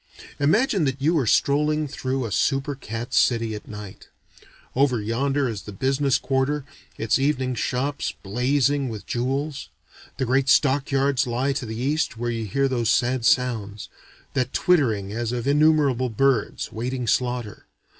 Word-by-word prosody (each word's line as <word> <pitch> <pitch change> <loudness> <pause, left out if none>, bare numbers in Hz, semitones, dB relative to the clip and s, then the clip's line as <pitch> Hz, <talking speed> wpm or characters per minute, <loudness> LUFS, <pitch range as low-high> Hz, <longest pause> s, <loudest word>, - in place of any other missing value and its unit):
Imagine 190 - +2
that 135 0 -1
you 155 +5 +2
are 130 - -1
strolling 150 +4 +2
through 130 -2 -3
a 110 - -5
super 135 +7 0
cat 115 -3 -6
city 115 -2 +2
at 105 - -8
night. 105 -2 -9 0.7
Over 130 -2 +2
yonder 135 +6 0
is 110 -4 -4
the 105 - -9
business 135 +4 +1
quarter, 135 +3 -1 0.3
its 110 +4 +1
evening 130 -2 0
shops 130 +4 -2
blazing 135 +5 +1
with 110 -3 -7
jewels. 135 +4 -2 0.5
The 130 - 0
great 135 +2 +1
stock 140 -1 +3
yards 135 -2 +1
lie 125 +4 0
to 130 -3 -4
the 110 +1 -5
east 145 0 -1
where 120 +1 -2
you 115 -2 -3
hear 135 +7 +1
those 120 -4 0
sad 125 -1 +1
sounds: 110 -5 0 0.4
that 130 -2 -1
twittering 110 - +2
as 115 0 -2
of 120 -1 -3
innumerable 145 -4 +3
birds, 125 0 0
waiting 125 +2 -3
slaughter. 120 -2 -1
130 Hz, 155 wpm, -24 LUFS, 115-140 Hz, 0.7 s, stock